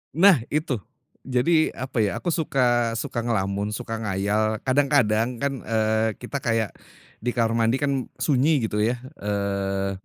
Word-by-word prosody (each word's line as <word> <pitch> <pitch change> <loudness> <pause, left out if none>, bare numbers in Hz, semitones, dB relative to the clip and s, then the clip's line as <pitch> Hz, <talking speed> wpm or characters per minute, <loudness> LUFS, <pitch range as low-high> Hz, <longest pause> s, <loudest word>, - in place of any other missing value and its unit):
Nah, 180 -3 +6
itu. 145 -5 -1 0.5
Jadi, 125 +5 +1 0.2
apa 130 -1 -4
ya, 105 -2 +3
aku 175 - 0
suka 120 -7 +1
suka 115 - -3
ngelamun, 105 -2 -1
suka 115 -2 -5
ngayal, 105 +1 0
kadang-kadang 130 -5 +3 0.2
kan, 140 -1 +1
eee, 110 -1 +1
kita 140 +3 -4
kayak 115 -4 0 0.5
di 120 +2 -2
kamar 115 -1 +2
mandi 115 +2 +3
kan 140 - +2 0.2
sunyi, 145 -1 +2
gitu 105 -1 -1
ya, 115 +4 +2 0.2
eee, 100 -1 -1
115 Hz, 145 wpm, -24 LUFS, 105-130 Hz, 0.5 s, Nah